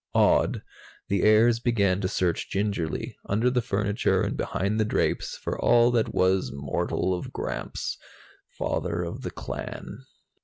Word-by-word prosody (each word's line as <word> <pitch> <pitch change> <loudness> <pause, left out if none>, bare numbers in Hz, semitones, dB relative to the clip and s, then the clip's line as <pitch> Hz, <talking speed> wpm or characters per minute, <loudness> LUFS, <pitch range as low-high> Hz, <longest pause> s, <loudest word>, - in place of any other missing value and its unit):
Awed, - - +3 0.5
the 100 -1 +1
heirs 115 +2 +5
began 100 -6 +1
to 95 - 0
search 90 -2 -1
gingerly, 100 -6 -2
under 110 +5 +2
the 125 -1 +1
furniture 105 -2 +1
and - - -1
behind 100 +3 -1
the - - +4
drapes, 110 - -1
for - - -4
all 120 0 +5
that 115 -2 +1
was 95 0 +2
mortal 70 +6 -1
of 90 - -4
Gramps, - - -4 0.5
father 90 0 -2
of 85 - -5
the - - -4
clan. 100 - -7
100 Hz, 145 wpm, -26 LUFS, 90-110 Hz, 0.5 s, heirs